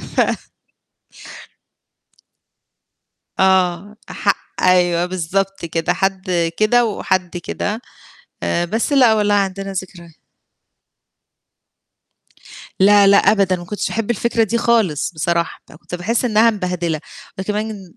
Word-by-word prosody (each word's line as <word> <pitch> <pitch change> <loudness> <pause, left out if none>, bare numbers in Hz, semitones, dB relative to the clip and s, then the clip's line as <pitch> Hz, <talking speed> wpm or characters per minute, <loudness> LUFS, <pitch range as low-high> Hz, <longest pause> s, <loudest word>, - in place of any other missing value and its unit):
ف - - +4
ف - - -2 2.9
آه 190 +1 +2
ح - - +1 0.3
أيوه 175 -1 +3
بالضبط 185 +1 -2
كده 165 +2 -1
حد 190 +1 -2 0.3
كده 235 +3 +3
وحد 185 -4 -2
كده. 210 +6 -4 0.6
آآ 170 - 0
بس 225 - -2
لأ 250 -5 +5
والله 210 -1 +2
عندنا 195 0 -1
ذكري 180 -2 -7 2.7
لا 200 +1 +6
لأ 200 0 +6
أبدًا، 195 -3 +3
ما 175 0 -9
كنتش 210 +3 -3
احب 225 0 -3
الفكرة 235 +1 +1
دي 230 +2 -1
خالص 225 -11 +1
بصراحة، 170 +1 -1
ده - - -15
أنا - - -14
كنت 180 - -8
باحس 225 +8 -1
إنها 225 0 +4
مبهدلة 180 -5 -2 0.4
وكمان 210 -2 -4
195 Hz, 115 wpm, -18 LUFS, 175-215 Hz, 2.9 s, لا